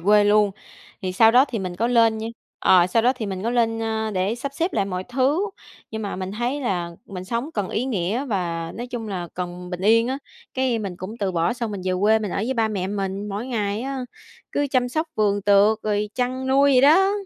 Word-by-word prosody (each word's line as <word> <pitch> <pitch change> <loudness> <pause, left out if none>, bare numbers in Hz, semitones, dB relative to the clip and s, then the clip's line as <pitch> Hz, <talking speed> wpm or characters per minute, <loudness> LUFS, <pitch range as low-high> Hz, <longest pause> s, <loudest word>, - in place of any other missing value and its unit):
quê 205 +4 +5
luôn. 205 0 +4 0.5
Thì 185 -1 -2
sau 225 +4 +6
đó 250 +3 +6
thì 240 -4 -3
mình 185 -2 -4
có 225 +5 +1
lên 230 -2 +3
nha 220 +1 -4 0.3
ờ, 180 -2 +5
sau 225 +5 +2
đó 250 +2 +4
thì 225 -4 -4
mình 190 -1 -4
có 230 - 0
lên, 225 -2 +1
ơ, 220 -1 -1
để 190 +2 0
sắp 275 +3 -5
xếp 340 +5 -1
lại 200 - +1
mọi 185 -1 -4
thứ. 275 - +1 0.4
Nhưng 220 0 -4
mà 200 - -4
mình 185 +1 -4
thấy 240 +6 -2
là 180 -9 -1 0.2
mình 185 -2 -7
sống 235 +9 -3
cần 200 -3 -1
ý 235 - -1
nghĩa 220 +1 -1
và 170 -8 -2
nói 240 +2 -5
chung 240 -3 -5
là 180 -4 -4
cần 180 0 -6
bình 180 -1 -5
yên 225 +4 +4
á, 265 +1 -2 0.4
cái 260 -3 +1
mình 195 -5 -5
cũng 200 +6 -7
từ 195 -4 -1
bỏ, 170 0 +1
xong 235 -2 -4
mình 200 -2 -5
về 185 - 0
quê 215 +2 +4
mình 210 -3 -4
ở - - -3
với 235 +6 -1
ba 225 -2 +1
mẹ 195 -4 -2
mình. 195 0 -3
Mỗi 205 +4 -4
ngày 215 -3 -2
á 270 +1 -3 0.5
cứ 290 - +1
chăm 250 -2 +2
sóc 315 +6 -1
vườn 205 -1 +1
tược 205 +2 +4
rồi 210 0 0
chăn 255 +1 -2
nuôi 275 +1 +4
vậy 255 - +6
đó. 370 +9 +5
220 Hz, 245 wpm, -23 LUFS, 195-245 Hz, 0.5 s, sau